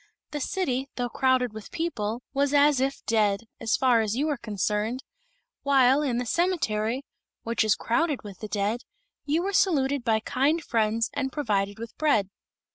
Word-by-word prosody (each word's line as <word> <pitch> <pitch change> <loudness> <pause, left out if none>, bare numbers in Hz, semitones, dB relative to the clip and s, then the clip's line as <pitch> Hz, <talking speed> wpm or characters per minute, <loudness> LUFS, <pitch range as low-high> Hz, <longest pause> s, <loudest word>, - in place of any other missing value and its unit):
The 295 - -3
city, 275 -6 -1
though 245 -1 -2
crowded 255 -2 +1
with 220 -1 -9
people, 240 -9 -3
was 280 +1 +1
as 290 -1 +5
if 270 +1 -2
dead, 210 -3 +2 0.2
as 230 0 +1
far 250 -4 +4
as 215 0 -1
you 280 +4 0
were 300 -3 0
concerned; 215 +2 -2 0.6
while, 270 0 +4
in 260 -5 0
the 245 - -1
cemetery, 255 -7 0 0.4
which 230 0 +1
is 215 -1 +3
crowded 295 +4 0
with 200 -3 -10
the 215 - -6
dead, 210 +3 -1 0.4
you 315 +4 +1
were 395 +1 -2
saluted 285 -9 +2
by 225 -2 +2
kind 285 +8 +1
friends 225 -1 0
and 270 -2 -2
provided 205 -8 -1
with 230 0 -8
bread." 220 -11 +2
250 Hz, 170 wpm, -26 LUFS, 220-285 Hz, 0.6 s, as